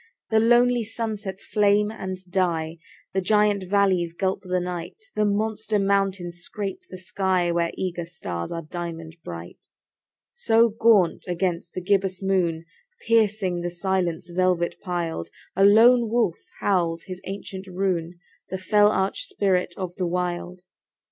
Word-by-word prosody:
The 220 - +5
lonely 240 +1 +4
sunsets 215 -3 -4
flame 210 0 +3
and 190 -4 -5
die; 170 -3 -1 0.3
The 190 - +1
giant 210 +1 +3
valleys 190 -4 +2
gulp 190 +2 -1
the 185 -1 -1
night; 180 - -5 0.2
The 210 - +2
monster 215 +1 0
mountains 195 -3 0
scrape 195 +2 -5
the 185 - -8
sky, 185 -2 0
Where 170 0 +1
eager 175 -2 -3
stars 90 - -5
are 165 0 -4
diamond 165 0 -6
bright. 85 0 -9 0.6
So 230 - +3
gaunt 215 -5 +3
against 175 -1 -2
the 185 - -2
gibbous 190 0 +1
moon, 180 -4 0 0.4
Piercing 210 -6 +2
the 175 - -2
silence 175 -1 -1
velvet 180 -1 +1
piled, 170 - -3 0.3
A 195 - +3
lone 230 +3 +6
wolf 220 -7 +1 0.2
howls 170 -4 +1
his 185 -1 -8
ancient 195 0 -7
rune— 180 -2 -2 0.3
The 190 - -3
fell 205 +2 +4
arch 195 - -1
spirit 190 - 0
of 185 -2 -5
the 180 - 0
Wild. 180 0 -3
185 Hz, 140 wpm, -24 LUFS, 175-205 Hz, 0.6 s, lone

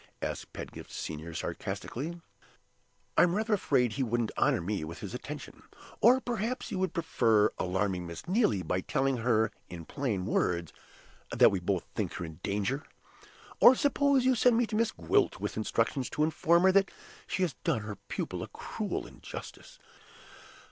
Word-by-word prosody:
asked - - -4
Pedgift - - -8
Senior, 80 +2 -5
sarcastically. 165 +8 -4 1.0
"I'm 175 0 +5
rather 220 +1 0
afraid 125 - +2
he 140 - -2
wouldn't 120 -1 0
honor - - +3
me 95 0 -2
with 80 +2 -6
his - - -7
attention. - - -7 0.4
Or 245 +4 +7
perhaps 240 0 -3
you 190 - -2
would 190 0 0
prefer 115 - +3
alarming 95 -1 -1
Miss 85 -1 -8
Neelie 180 - +2
by 90 +3 -1
telling 135 +6 0
her 115 -2 +2 0.2
in 85 -2 -8
plain 105 - -2
words 85 -5 0 0.6
that - - +6
we 95 - 0
both 90 0 -1
think - - -2
her 85 - -4
in 80 -2 -10
danger? 105 +9 -1 0.8
Or, 260 - +9
suppose 280 -1 +3
you 260 - +5
send 245 0 +4
me 240 - +3
to 220 - -4
Miss 230 +1 +2
Gwilt, 80 - +1
with - - -3
instructions 115 +4 0
to 150 - 0
inform 170 +2 +3
her 190 - +6
that 195 0 +4 0.4
she 185 - 0
has 170 -6 0
done 155 -10 +1
her 105 -1 -6
pupil - - -3
a - - -5
cruel - - -4
injustice? - - -10
125 Hz, 165 wpm, -30 LUFS, -, 1.0 s, Or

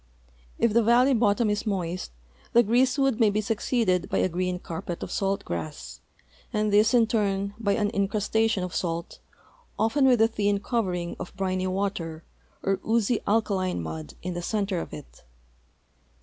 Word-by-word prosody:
If 230 -2 +2
the 235 - +5
valley 245 +4 +4
bottom 220 -1 +2
is 210 +2 -2
moist, 180 - -2 0.4
the 235 - +6
greasewood 255 +2 +2
may 225 -3 +5
be 205 +1 0
succeeded 215 -2 0
by - - 0
a - - +2
green 180 +1 -1
carpet 170 0 -6
of - - -6
salt 195 0 -1
grass, 80 -3 -6 0.5
and 210 -1 0
this 215 +4 +5
in 235 -2 +5
turn 200 -3 0
by 200 -3 +1
an 205 0 0
incrustation 210 0 +1
of 180 -2 -5
salt, 170 -1 -3 0.6
often 265 +6 +2
with 250 -3 +4
a 225 - +6
thin 205 -3 0
cov 230 +2 -1
ering 175 -2 -3
of 185 - -8
briny 185 -1 -1
water 185 -4 -3 0.4
or 195 0 +1
oozy 225 0 +1
alkaline 200 - +1
mud 80 -3 -7
in 180 +1 -3
the 175 - -4
center 200 -1 -1
of - - -6
it. 150 - -11
200 Hz, 165 wpm, -26 LUFS, 185-225 Hz, 0.6 s, the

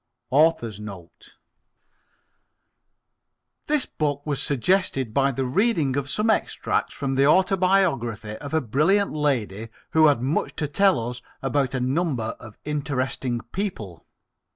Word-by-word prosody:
AUTHOR'S 130 - +2
NOTE 100 -5 -11 2.3
This 300 -2 +2
book 145 -2 -2
was 145 -3 -1
suggested 140 - +1
by 140 +1 +3
the 135 +1 -2
reading 155 - +1
of 140 0 -2
some 210 +8 0
extracts - - -1
from 135 -2 -2
the 135 +1 +3
autobiography 180 - +2
of 145 - -8
a 160 0 +1
brilliant 155 - +2
lady 115 -8 -1 0.2
who 160 -1 +6
had 145 -5 +3
much 140 +5 -1
to 150 - -2
tell 145 - +2
us 125 0 -8 0.2
about 135 0 0
a - - 0
number 130 -3 -1
of 110 -3 -12
interesting 130 -4 -2
people. 110 - -5
140 Hz, 130 wpm, -24 LUFS, 120-160 Hz, 2.3 s, who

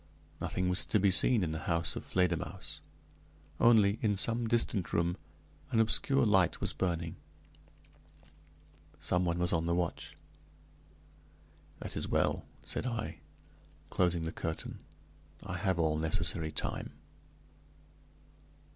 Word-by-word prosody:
Nothing 90 - -1
was 90 +1 +3
to 105 - +2
be 100 0 +4
seen 110 +3 +4
in 80 - -1
the 80 - -3
house 85 0 +1
of - - -5
Fledermausse; 90 -3 -1 0.8
only, 110 -3 +5
in 105 -3 +1
some 115 +3 0
distant 110 -5 0
room, 85 +1 +1 0.5
an 115 - +1
obscure 130 +4 +3
light 95 -5 +3
was - - 0
burning. 85 -3 -2 1.8
Some 90 0 0
one 85 -1 0
was 90 0 0
on 85 0 +1
the 85 - +2
watch. 90 -1 -3 1.6
"That - - -6
is - - -2
well," - - +1 0.2
said - - -3
I, 115 -3 -4 0.7
closing 90 -2 +2
the 80 - -3
curtain. 80 -1 -5 0.7
"I 95 -2 -4
have 95 -2 0
all 80 -2 +2
necessary 80 0 +1
time." 70 - -3
90 Hz, 125 wpm, -32 LUFS, 85-105 Hz, 1.8 s, only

